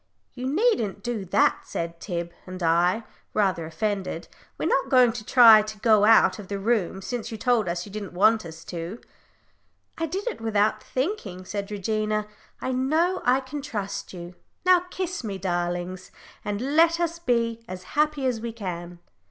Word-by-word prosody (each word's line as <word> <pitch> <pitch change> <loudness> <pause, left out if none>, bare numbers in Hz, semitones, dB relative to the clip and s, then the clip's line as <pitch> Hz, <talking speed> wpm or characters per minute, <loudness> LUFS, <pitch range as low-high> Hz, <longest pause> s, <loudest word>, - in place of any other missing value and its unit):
"You 255 0 -4
needn't 320 - +1
do 235 -5 -3
that," 180 - +3
said 170 0 -4
Tib 170 -2 -4 0.2
and 185 -1 -6
I, 175 +6 +3 0.3
rather 185 -6 +1
offended; 185 0 -3 0.3
"we're - - -3
not - - +1
going 250 -3 +6
to 225 -1 -7
try 225 -1 +8
to 215 0 -7
go 215 -2 +5
out 225 0 +5
of 200 - -9
the 200 - -3
room, 195 -3 0
since 235 +1 -4
you 225 - -5
told 235 -4 +1
us 175 +1 -3
you 205 - -11
didn't 200 -3 -6
want 215 +5 +4
us 160 -1 -10
to." 175 +6 -6 1.0
"I 330 - 0
did 380 +6 -4
it 470 - -3
without 215 -1 +1
thinking," 255 - -3
said 200 +1 -4
Regina. 215 +1 -1 0.3
"I 260 - -2
know 315 +9 +1
I 255 +2 +4
can 280 +2 -6
trust 205 -8 -5
you. 175 -1 -8 0.3
Now 365 -1 +5
kiss 365 -4 -4
me, 200 -3 -4
darlings, 175 0 -3 0.3
and 225 +8 -2
let 335 +1 +5
us 340 0 -1
be 230 -6 0
as 185 -2 -7
happy 300 -2 +1
as 245 -4 0
we 235 0 -4
can." 175 -5 -6
215 Hz, 175 wpm, -25 LUFS, 185-255 Hz, 1.0 s, try